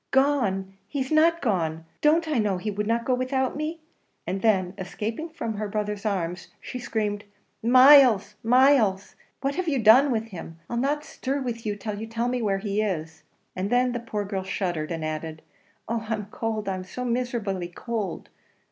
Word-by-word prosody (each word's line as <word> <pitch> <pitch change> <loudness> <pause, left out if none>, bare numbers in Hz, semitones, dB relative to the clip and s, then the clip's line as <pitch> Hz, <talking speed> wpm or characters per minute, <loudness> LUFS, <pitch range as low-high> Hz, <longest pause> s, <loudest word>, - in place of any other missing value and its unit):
"Gone! 235 -9 +1
he's 265 +4 -3
not 330 +2 +4
gone; 165 - -1 0.2
don't 320 +2 +3
I 300 -6 +1
know 205 -3 +1
he 210 +4 -3
would 210 +1 -2
not 230 +1 0
go 255 - +2
without 255 +1 0
me?" 310 +2 -4 0.4
and 190 +2 -3
then 190 -5 +2
escaping 220 - -4
from 230 -8 -4
her 210 0 -3
brother's 210 0 -2
arms, 180 -3 -2
she 250 - -7
screamed, 210 -3 -2 0.4
"Myles, 255 -2 +7
Myles! 240 -5 +3 0.3
what 275 +1 0
have 370 +3 -3
you 290 -4 +1
done 245 +5 +6
with 225 -2 -1
him? 165 -4 -9
I'll 235 - -1
not 290 +4 0
stir 275 -1 -3
with 235 -3 -4
you 205 - -1
till 205 0 -5
you 225 - -5
tell 230 +2 -1
me 250 0 -1
where 200 -3 +1
he 205 +1 -1
is!" 160 -6 -3 0.3
and 185 +2 -2
then 250 +1 +3
the 240 - -2
poor 210 -3 -4
girl 195 -1 -3
shuddered, 175 -4 -2
and 165 -2 -3
added, 155 0 -5 0.4
"Oh! 230 0 -2
I'm 215 -2 -2
cold, 220 -2 -3 0.2
so 250 +6 -5
miserably 235 -7 -2
cold!" 205 +1 -4
220 Hz, 180 wpm, -25 LUFS, 195-255 Hz, 0.4 s, Myles